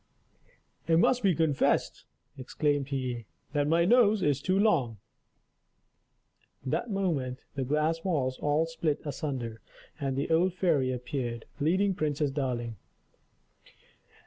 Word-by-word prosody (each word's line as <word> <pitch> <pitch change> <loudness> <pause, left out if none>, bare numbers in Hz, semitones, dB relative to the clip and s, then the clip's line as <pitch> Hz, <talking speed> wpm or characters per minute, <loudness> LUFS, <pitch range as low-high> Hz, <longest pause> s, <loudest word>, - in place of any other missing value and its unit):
"It 165 -1 +4
must 250 +8 +3
be 195 -6 +3
confessed," 155 -4 +1 0.3
exclaimed 140 +1 -1
he, 125 -5 -3 0.3
"that 145 -1 +1
my 165 +2 +3
nose 220 -1 +4
is 145 -2 +1
too 185 +4 +1
long." 145 - +2 1.7
That 135 - -1
moment 155 -11 -2
the 135 - -2
glass 155 +4 0
walls 135 -8 -1
all 150 +2 +2
split 165 -2 -1
asunder, 130 -6 -4 0.4
and 135 -2 -2
the 140 +4 -2
old 175 +3 +3
fairy 150 -9 +2
appeared, 125 -2 -4
leading 185 +7 +2
Princess 150 -4 -1
Darling. 120 -5 -3
145 Hz, 120 wpm, -29 LUFS, 130-170 Hz, 1.7 s, It